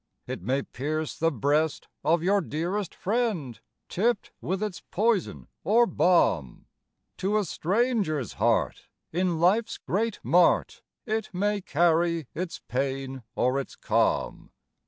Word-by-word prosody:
It - - -5
may 130 +8 0
pierce 155 +3 -3
the 165 +1 +1
breast 145 +4 0 0.2
of 165 +1 +2
your 200 +2 +3
dearest 170 +5 -3
friend, 195 - -1 0.3
Tipped 225 +3 0
with 190 +3 -2
its 205 -4 -4
poison 215 -1 0 0.2
or 235 +4 +5
balm; 100 - +2 0.5
To 200 +3 +1
a 210 - +1
stranger's 190 - 0
heart 105 - 0 0.2
in 175 -1 0
life's 205 +7 +2
great 220 +3 -1
mart, 175 0 +3 0.2
It 220 -1 -2
may 205 +2 0
carry 170 -1 +2
its 175 0 -4
pain 135 0 -2
or 130 +2 +2
its 135 - -6
calm. - - 0
170 Hz, 125 wpm, -27 LUFS, 145-205 Hz, 0.5 s, or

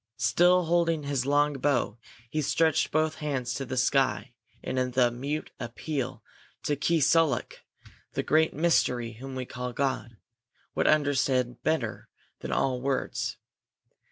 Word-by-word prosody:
Still 180 +7 +4
holding 165 -2 +1
his 140 -2 -1
long 145 +1 +3
bow 125 -5 0 0.3
he 155 +6 -2
stretched 160 +2 +2
both 155 0 0
hands 130 -5 -2
to 135 +2 -4
the 130 - -4
sky 130 -1 +1 0.3
in 130 - -3 0.2
the 125 -1 +3
mute 140 +6 -4
appeal 125 0 -4 0.4
that 145 -1 -1
Keesuolukh, 165 -3 +2 0.6
the - - -1
Great 160 +1 +3
Mystery 125 -7 +1
whom 135 0 -7
we 130 -1 -3
call 125 0 -5
God, 125 -5 -2 0.6
would - - +1
understand 135 -4 +2
better 150 -8 -1 0.3
than - - -6
all 130 -2 0
words. 135 0 -2
135 Hz, 130 wpm, -28 LUFS, 125-155 Hz, 0.6 s, Still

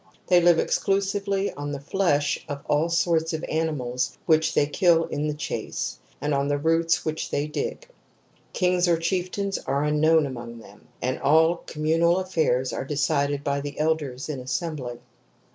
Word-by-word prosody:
They 180 -1 +6
live 175 -1 +5
exclu 195 +4 +1
sively 200 0 -1
on 145 0 -5
the 140 - -4
flesh 145 -2 0
of 145 0 -6
all 150 +3 +2
sorts 165 -1 +1
of 160 - -3
animals 130 -6 -2
which 160 -1 +3
they 145 - +4
kill 165 +2 +3
in 150 -1 -2
the 150 - -2
chase, 150 -2 -4 0.2
and 150 0 -1
on 140 0 +1
the 145 0 +1
roots 165 +2 +1
which 155 0 -3
they 145 - -1
dig. 470 - -4 0.6
Kings 180 -1 +2
or 170 -1 +3
chieftains 185 +3 -2
are 140 +2 -1
unknown 155 +1 +3
among 120 -3 -7
them, 105 -2 -16 0.2
and 130 +1 -1
all 160 +4 +4
communal 165 +3 +2
affairs 155 -9 0
are - - -3
decided 145 0 0
by 140 0 -1
the 145 0 -6
elders 150 -5 -1
in 150 -4 -4
assembly. 130 -1 -4
155 Hz, 165 wpm, -25 LUFS, 140-170 Hz, 0.6 s, They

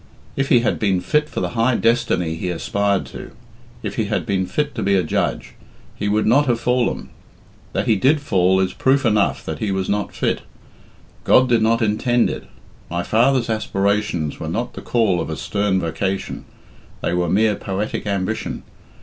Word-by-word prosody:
If 135 0 -1
he 120 - +5
had 120 - 0
been 95 -4 +2
fit 150 +10 0
for - - -4
the - - -1
high 120 +1 +2
destiny 105 -9 +1
he 85 +2 -4
aspired 100 +3 0
to - - -9 0.5
if - - -4
he - - +1
had - - -1
been 95 -2 0
fit 150 -1 -1
to - - -4
be 100 0 +2
a 95 - +2
judge, 80 - -2 0.4
he 100 - -2
would 105 +1 +1
not 140 +6 +4
have 120 -2 +1
fallen. 125 0 0 0.6
That - - 0
he 110 - +3
did 140 +9 +3
fall 95 -8 +2
is 95 -1 0
proof 135 +4 +2
enough 105 -3 +1
that - - -4
he 105 - -1
was 95 -1 -1
not 105 0 -1
fit. - - 0 0.8
God 130 - +5
did 120 -2 +3
not 115 +1 +2
intend 115 +3 +2
it. - - -6 0.4
My 85 0 -2
father's 120 +4 +2
aspirations 100 -7 -1
were 80 - -4
not 120 +8 -3
the - - -8
call 110 -7 +1
of - - -4
a 80 - -4
stern 100 -2 0
vocation, 95 +3 -3 0.6
they - - -1
were 90 -1 0
mere 105 +3 +3
poetic 100 +2 -3
ambition. 100 +2 -2
105 Hz, 185 wpm, -20 LUFS, 95-120 Hz, 0.8 s, he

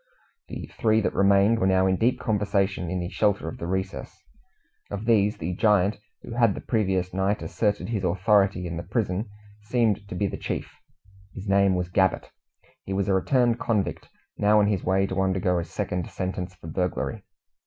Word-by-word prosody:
The - - -6
three 110 -1 +3
that - - -1
remained 100 +3 +4
were 95 - +2
now 95 0 +3
in 95 0 +3
deep 125 +6 +1
conversation 100 -5 0
in 90 +1 -2
the 90 - -4
shelter 100 -5 0
of 80 - -6
the 85 - -4
recess. 95 +1 -4 0.7
Of 100 +2 -5
these, 105 -2 +3
the 85 +3 -3
giant 105 0 +2 0.2
who - - -9
had 115 -4 +3
the - - -6
previous 95 -5 0
night 95 +2 0
asserted 105 -1 -1
his 105 -5 -2
authority 95 +1 +2
in 85 -1 -4
the - - -3
prison 100 +2 -2 0.3
seemed 110 -2 0
to 90 - -6
be 100 - 0
the 95 - -3
chief. - - -4 0.6
His 100 +1 -7
name 100 -1 +3
was 90 0 -3
Gabbett. 95 +1 +1 0.5
He 95 - -5
was 95 0 0
a - - +3
returned 120 +4 +2
convict, 105 -5 -1 0.3
now 105 +1 +4
on 105 - +4
his 100 -3 0
way 95 +1 +2
to 95 0 -1
undergo 95 -2 +1
a - - -2
second 90 +1 -4
sentence 90 0 -4
for 90 - -16
burglary. 90 +2 -2
100 Hz, 185 wpm, -25 LUFS, 95-105 Hz, 0.7 s, remained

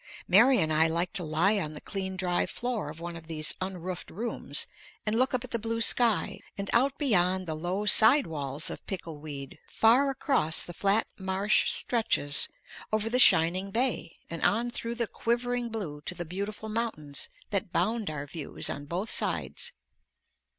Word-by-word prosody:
Mary 240 +8 +7
and 155 -1 +2
I 160 +1 +5
like 170 +2 0
to 190 -4 0
lie 170 +7 +2
on 155 -4 -4
the - - -7
clean 190 -2 -5
dry 180 -1 0
floor 240 -10 -3
of 155 +2 -9
one 170 0 -6
of 165 -1 -11
these 155 -1 -3
unroofed 185 -1 -5
rooms 230 +6 -2 0.4
and 215 0 +1
look 255 +2 +2
up 250 - -2
at 255 - -9
the 235 - -1
blue 230 +1 -2
sky 230 -1 +3 0.2
and 200 0 -4
out 265 +4 +3
beyond 185 - +2
the 160 - -3
low 175 +6 -3
side 225 +7 +6
walls 145 -2 -2
of - - -8
pickle 165 -5 -6
weed 140 -3 -8
far 245 +5 +4
across 265 - +2
the 175 - -8
flat 200 +5 +2
marsh 190 +2 +1
stretches, 220 - +1 0.4
over 215 +1 0
the 250 - +2
shining 185 -2 +5
bay, 230 -6 -1
and 165 - -6
on 235 +3 +1
through 235 0 -3
the 235 0 -1
quivering 240 +2 -2
blue 180 -10 -5
to 180 - -2
the 175 - -5
beautiful 200 +5 -5
mountains 215 -11 -3 0.2
that 200 -2 -1
bound 215 +3 0
our 150 -2 -5
views 150 0 -3
on 145 0 -7
both 180 +7 -3
sides. 485 - -1
195 Hz, 180 wpm, -28 LUFS, 165-230 Hz, 0.4 s, Mary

